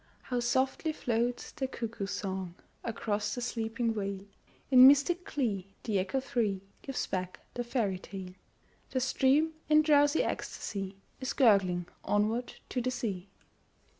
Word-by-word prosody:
How 250 -1 -1
softly 260 +6 +1
floats 240 -2 -1
the 265 - -3
cuckoo's 225 -5 -4
song 190 -4 -3 0.3
Across 210 -2 -2
the 245 - -4
sleeping 230 -1 -1
vale; 200 -2 -3 0.5
In 255 0 +10
mystic 285 +6 +4
glee 200 -8 -2
the 210 -4 +1
echo 190 +8 0
free 230 -8 -1 0.2
Gives 270 -2 -3
back 185 -1 -4
the 245 - -2
fairy 225 -6 -1
tale. 190 -1 -8 0.6
The 260 - 0
stream, 270 +5 +3 0.2
in 305 0 +6
drowsy 290 0 +4
ecstasy, 195 -1 -4 0.2
Is 260 0 -2
gurgling 195 -8 +4 0.2
onward 220 +4 0
to 250 - -1
the 255 - 0
sea. 200 -7 -3
230 Hz, 135 wpm, -31 LUFS, 195-260 Hz, 0.6 s, In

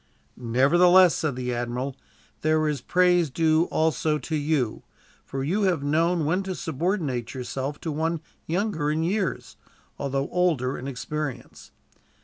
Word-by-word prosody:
"Nevertheless," 170 +10 +5
said 150 -5 -1
the 125 -1 -3
admiral, 120 +3 -3 0.5
"there 155 0 +2
is 150 -2 -2
praise 180 -3 +3
due 160 +3 +2
also 155 -2 +1
to 160 +1 -4
you, 145 -6 0 0.4
for 135 -1 -4
you 185 +10 0
have 180 -7 +1
known 165 +3 +1
when 180 +6 +1
to 190 -1 -4
subordinate 155 - -2
yourself 135 +3 -4
to 160 - -3
one 160 +2 -1 0.3
younger 170 -3 -1
in 155 +2 0
years, 190 +2 -2 0.4
although 140 0 -1
older 160 -8 +1
in 130 - -6
experience. 140 -1 -5
155 Hz, 135 wpm, -25 LUFS, 135-175 Hz, 0.5 s, Nevertheless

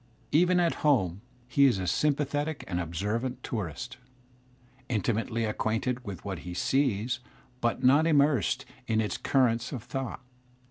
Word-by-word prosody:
fiven 180 +3 +4
at 170 -1 +3
home 100 - +2 0.3
he 140 +3 +4
is 125 -7 +4
a 95 - -2
sympathetic 145 - 0
and 90 -2 -2
observant 105 +10 -2
tourist, 115 - -4 0.9
intimately 115 0 0
acquainted 115 +3 -1
with 100 -6 -7
what 95 -4 -3
he 90 +1 -7
sees 120 -1 +1 0.4
but 120 -1 0
not 145 +5 +5
immersed 145 - +3 0.2
in 110 -1 +2
its 105 -1 0
currents 120 -3 +1
of 125 -6 -5
thought. 130 0 -5
120 Hz, 135 wpm, -29 LUFS, 105-140 Hz, 0.9 s, not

